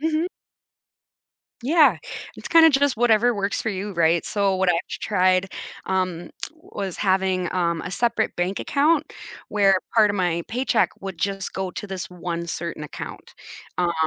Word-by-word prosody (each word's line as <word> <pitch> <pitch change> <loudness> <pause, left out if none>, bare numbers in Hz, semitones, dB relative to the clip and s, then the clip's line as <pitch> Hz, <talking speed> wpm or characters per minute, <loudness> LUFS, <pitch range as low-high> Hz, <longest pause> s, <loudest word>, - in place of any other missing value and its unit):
Mhm. 320 +3 0 1.4
Yeah. 310 +4 +5 0.4
It's - - -8
kinda 325 -1 +8
just 280 -4 +2
whatever 240 0 +4
works 200 -1 -1
for - - -1
you, 200 0 -4
right? 170 0 +2
So 200 -2 +1
what 190 -1 +2
I've 175 - +4
tried, 185 -2 +1 0.4
um, 185 -2 -1 0.2
was 205 - -6
having, 190 -2 +1
um, 170 -2 0
a 180 - -6
separate 230 +1 0
bank 180 +3 -1
account 305 +2 +1 0.3
where 195 -2 +3 0.2
part 215 -2 +6
of 205 - -1
my 170 -2 0
paycheck 245 0 +2
would 195 -3 -6
just 195 +1 -2
go 190 -1 -3
to 205 - -6
this 190 -2 -5
one 170 -1 -4
certain 170 -2 -5
account. 150 - -8 0.4
Um, 175 -1 +1
195 Hz, 155 wpm, -23 LUFS, 180-230 Hz, 1.4 s, kinda